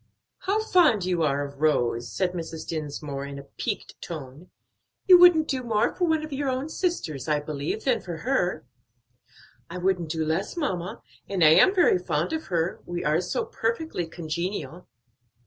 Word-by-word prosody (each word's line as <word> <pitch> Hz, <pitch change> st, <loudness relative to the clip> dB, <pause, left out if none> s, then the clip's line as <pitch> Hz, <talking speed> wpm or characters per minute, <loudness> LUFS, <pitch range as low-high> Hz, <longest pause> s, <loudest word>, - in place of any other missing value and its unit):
"How 415 Hz, +3 st, 0 dB
fond 310 Hz, -, +4 dB
you 180 Hz, -2 st, 0 dB
are 145 Hz, -2 st, +1 dB
of 140 Hz, 0 st, -11 dB
Rose," 120 Hz, -6 st, +1 dB
said 185 Hz, -2 st, 0 dB
Mrs. 165 Hz, -2 st, -6 dB
Dinsmore 145 Hz, -3 st, -4 dB
in 140 Hz, 0 st, -7 dB
a 140 Hz, -, -8 dB
piqued -, -, -5 dB
tone; 150 Hz, +1 st, -8 dB, 0.6 s
"you 365 Hz, -3 st, +9 dB
wouldn't 340 Hz, -3 st, +7 dB
do 265 Hz, -2 st, -1 dB
more 220 Hz, -3 st, +1 dB
for 360 Hz, -, 0 dB
one 315 Hz, -1 st, +1 dB
of 305 Hz, -, -8 dB
your 275 Hz, 0 st, -1 dB
own 260 Hz, +4 st, -2 dB
sisters, 170 Hz, -, -2 dB
I 150 Hz, -1 st, +2 dB
believe, 150 Hz, +7 st, -4 dB
than 260 Hz, -3 st, +1 dB
for 175 Hz, -3 st, -6 dB
her." 180 Hz, -, 0 dB, 1.0 s
"I 175 Hz, -, -6 dB
wouldn't 180 Hz, -2 st, 0 dB
do 160 Hz, 0 st, -1 dB
less, 160 Hz, -, -2 dB
mamma, 190 Hz, -, -3 dB, 0.3 s
and 190 Hz, -4 st, +1 dB
I 155 Hz, -, +8 dB
am 375 Hz, -, +6 dB
very 345 Hz, -, +4 dB
fond 165 Hz, -, -1 dB
of 320 Hz, 0 st, -3 dB
her; 170 Hz, -1 st, -1 dB
we 175 Hz, 0 st, -4 dB
are 155 Hz, +3 st, +2 dB
so 180 Hz, -, -2 dB
perfectly 230 Hz, -, -2 dB
congenial." 170 Hz, +2 st, -5 dB
175 Hz, 175 wpm, -26 LUFS, 155-260 Hz, 1.0 s, you